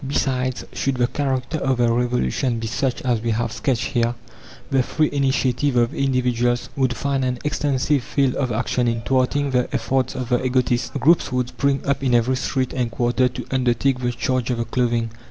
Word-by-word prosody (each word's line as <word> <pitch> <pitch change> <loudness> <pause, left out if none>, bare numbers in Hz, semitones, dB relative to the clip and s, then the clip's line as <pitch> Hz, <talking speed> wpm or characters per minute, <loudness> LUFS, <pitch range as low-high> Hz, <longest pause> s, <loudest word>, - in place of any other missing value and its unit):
Besides, 130 -2 -1
should 135 -1 -1
the 125 -1 +2
character 135 +3 -2
of 135 -2 0
the 120 -1 +3
Revolution 120 - 0
be 115 - -4
such 120 +3 -2
as 120 -3 +1
we 115 - -2
have 115 +1 0
sketched 125 -1 -1
here, 120 -1 +1 0.6
the 135 - +4
free 155 +4 0
initiative 135 -1 +1
of 120 -1 +2
individuals 125 -3 0
would 130 -3 +1
find 140 0 -1
an 125 -1 -1
extensive 145 -1 +1
field 135 +1 0
of 130 -3 -1
action 120 +2 0
in 115 -1 0
thwarting 135 +3 +1
the 125 -1 +1
efforts 130 0 0
of 125 -2 -4
the 125 0 +1
egotists. 125 -1 +1
Groups 155 +3 +3
would 125 -1 0
spring 140 0 0
up 140 0 0
in 125 -2 +3
every 120 +2 +2
street 130 -1 -1
and 125 -3 -1
quarter 120 +2 +1
to 125 0 -7
undertake 130 0 +1
the 125 -1 -1
charge 125 +1 -1
of 125 - 0
the 115 - -1
clothing. 115 -1 0
125 Hz, 190 wpm, -22 LUFS, 120-135 Hz, 0.6 s, the